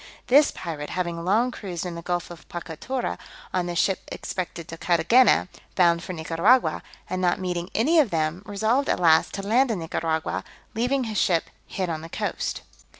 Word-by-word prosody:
This 290 +4 +6
pirate, 150 -4 -6
having 170 -2 -3
long 220 +8 +2
cruised 185 -6 -5
in 175 - -4
the 170 - -6
Gulf 175 0 -3
of 170 - -12
Pocatauro, 175 +10 -4 0.3
on 180 -1 0
the 175 - -3
ships 185 +2 +1
expected 175 -3 -5
to 165 - -7
Carthagena, 180 +11 +4 0.3
bound 170 -2 +4
for 185 - -6
Nicaragua, 170 +9 +2 0.3
and 185 0 -3
not 180 -1 +2
meeting 180 -1 -3
any 310 +9 +4
of 280 -7 +4
them, 160 +1 -1
resolved 220 +7 +1
at - - +1
last 160 -2 +4
to 195 - -4
land 240 +6 +3
in 220 - 0
Nicaragua, 160 - -2 0.3
leaving 250 +4 +1
his 220 -3 -2
ship 170 -3 +1 0.2
hid 185 -2 -3
on 160 -2 -3
the 165 - -9
coast. - - -3
180 Hz, 180 wpm, -25 LUFS, 170-220 Hz, 0.3 s, This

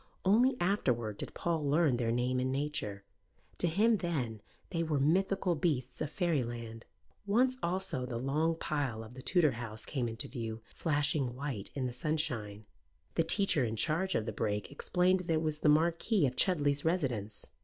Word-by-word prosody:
Only 245 +7 +4
afterward 120 - 0
did - - -6
Paul 165 -3 -1
learn 150 -4 +3
their 115 -1 0
name 125 +2 0
and 130 +1 0
nature: 135 -8 -2 0.6
to 175 - +3
him 215 +7 +3
then 130 - -3 0.3
they 165 -3 -1
were 155 -3 0
mythical 185 +5 +2
beasts 135 -6 -1
of 150 - -1
fairyland. 120 - -2 0.4
Once 255 +5 +2
also 175 -8 -1
the 120 -2 -4
long 150 +6 0
pile 140 -8 -2
of 110 +2 -12
the 130 - -9
Tudor 165 0 +3
house 115 -2 -6
came 130 -5 -2
into 115 0 -3
view, 115 -3 -5
flashing 145 -5 +1
white 130 -7 -4
in 135 -2 -1
the 125 - -3
sunshine. 125 -8 -1 0.5
The 165 - +2
teacher 160 -3 +4
in 115 -2 -1
charge 170 - +1
of 110 - 0
the 110 - -3
brake 105 +1 -2
explained 180 +5 +2
that 170 -2 -1
it 160 - +1
was 155 -1 -2
the 150 - +3
Marquis 170 +5 +3
of 130 -1 -1
Chudley's 145 -5 +2
residence. 120 - -1
145 Hz, 175 wpm, -32 LUFS, 120-170 Hz, 0.6 s, Only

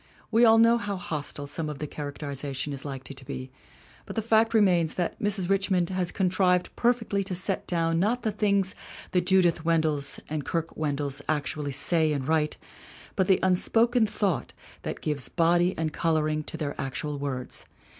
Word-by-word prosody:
We 230 +2 +5
all 225 0 +7
know 230 +1 +5
how 205 -2 -3
hostile 150 -4 -5
some 150 +2 -4
of 150 - -5
the 150 - -4
characterization 145 -1 -5
is 135 - -7
likely 135 -1 -6
to 135 - -11
be, 130 0 -6 0.6
but - - -7
the 225 - -1
fact 225 0 +3
remains 180 -7 +3
that 175 -2 -2
Mrs. 200 -3 +1
Richmond 190 -2 +1
has 185 -2 0
contrived 180 -1 +1
perfectly 230 -4 +1
to 190 -1 -3
set 190 +2 -2
down 165 -1 +1
not 225 +7 +1
the 220 - +1
things 200 -2 +1 0.4
the 180 - +3
Judith 175 -3 +3
Wendells 155 -4 +1
and 150 -1 -3
Kirke 165 +3 -3
Wendells 145 -2 -2
actually 150 -1 -1
say 155 +2 +2
and 135 -2 -3
write 155 -1 +1 0.6
but 190 -2 +1
the 190 - +4
un 185 -1 +4
spoken 230 +4 +3
thought 200 -5 -1 0.3
that - - -5
gives 150 -3 -1
body 175 +2 +2
and 160 -2 -2
coloring 155 -2 +1
to - - -5
their 150 -3 -3
actual 140 +2 -3
words. 130 -3 -4
165 Hz, 175 wpm, -27 LUFS, 150-195 Hz, 0.6 s, all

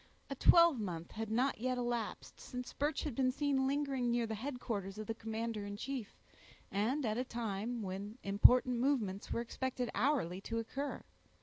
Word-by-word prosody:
A - - -1
twelvemonth 220 - +4
had 220 0 -4
not 250 +4 +1
yet 255 +2 0
elapsed, 240 -3 -3
since 250 -1 -6
Birch 290 +1 0
had 295 - -2
been 255 +1 +2
seen 275 -1 +1
lingering 275 -3 0
near 235 0 +2
the 220 - -3
headquarters 220 -5 -4
of 215 - -4
the 225 - -2
commander 225 -1 -3
in 205 0 -5
chief, 250 -2 -5 0.5
and 240 +8 +1
at 220 +1 0
a - - +1
time 230 -1 -3
when 200 +4 -5
important 245 +5 +5
movements 230 -8 0
were - - 0
expected 250 +1 -3
hourly 210 - +1
to 230 +3 -3
occur. 270 +5 -3
235 Hz, 170 wpm, -35 LUFS, 215-260 Hz, 0.5 s, important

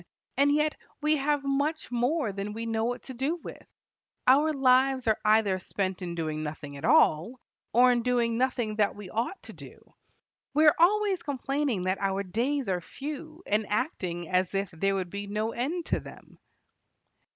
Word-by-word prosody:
And 285 +1 +4
yet 300 +1 +2 0.2
we 305 +1 +2
have 290 0 0
much 285 +2 -1
more 245 +1 0
than 200 +1 -5
we 225 +1 -5
know 225 -1 -1
what 245 +1 -3
to 260 - -8
do 270 +7 -1
with. 345 - -11 0.6
Our 290 +5 +5
lives 265 -1 +3
are 220 -2 +2
either 210 -3 +3
spent 190 0 -3
in 175 -1 -4
doing 155 -2 -3
nothing 150 -2 -6
at 140 - -10
all, 175 +15 +3 0.3
or 250 +2 +6
in 240 -1 +2
doing 235 -1 +1
nothing 240 -3 -1
that 205 -2 +2
we 205 -3 -9
ought 240 - -3
to - - -10
do. - - -14 0.6
We 310 +1 +5
are 300 - +7
always 390 +1 +3
complaining 275 - -1
that 185 +2 -1
our 195 0 0
days 245 +7 -1
are 180 -2 0
few, 305 - -8
and 210 +2 +1
acting 185 - -2
as 185 +1 0
if 195 -1 -1
there 195 +4 0
would 185 -2 -3
be 200 0 -5
no 215 +2 -2
end 310 +9 -2
to - - 0
them." - - -14
235 Hz, 180 wpm, -28 LUFS, 195-285 Hz, 0.6 s, are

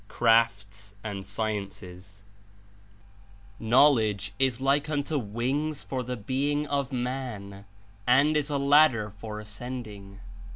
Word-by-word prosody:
CRAFTS 105 -4 +1
AXD 100 -3 -4
SCIEyCES 100 -2 -5 1.4
"Knowledge 110 -5 +3
is 130 -3 +2
like 140 +3 +1
unto 145 0 -1
wings 130 +7 -2
for 130 -1 -3
the 125 0 -4
being 140 +7 -1
(of 140 -2 -2
man), 120 -6 -5 0.4
and 140 +5 +4
is 150 -2 +1
as 145 - -2
a - - +2
ladder 140 -6 +4
for 105 +1 -8
ascending. 105 -2 -7
115 Hz, 115 wpm, -27 LUFS, 105-140 Hz, 1.4 s, and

